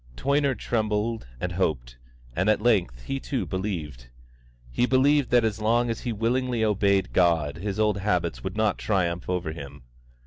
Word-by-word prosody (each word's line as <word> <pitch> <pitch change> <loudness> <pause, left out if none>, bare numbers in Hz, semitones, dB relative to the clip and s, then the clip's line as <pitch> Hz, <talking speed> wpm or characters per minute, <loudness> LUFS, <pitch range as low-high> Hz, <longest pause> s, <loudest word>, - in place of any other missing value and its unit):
Toyner 140 -1 +1
trembled 110 - -1
and 90 - -3
hoped, 65 -10 -2 0.4
and 95 +4 +1
at 110 - +3
length 95 - +1
he 135 - -3
too 135 -1 -3
believed. 80 - -4 0.6
He 120 - +1
believed 135 +1 +3
that 120 -2 +4
as 110 0 -2
long 120 +2 +2
as 115 - -4
he 120 - -2
willingly 120 +1 0
obeyed 100 -2 +1
God 80 -5 +2
his 100 +3 -4
old 105 -2 +2
habits 85 -10 -1
would 100 - -4
not 110 -2 +1
triumph 90 -5 -1
over 90 -3 -1
him. 70 -5 -9
105 Hz, 165 wpm, -26 LUFS, 85-115 Hz, 0.6 s, that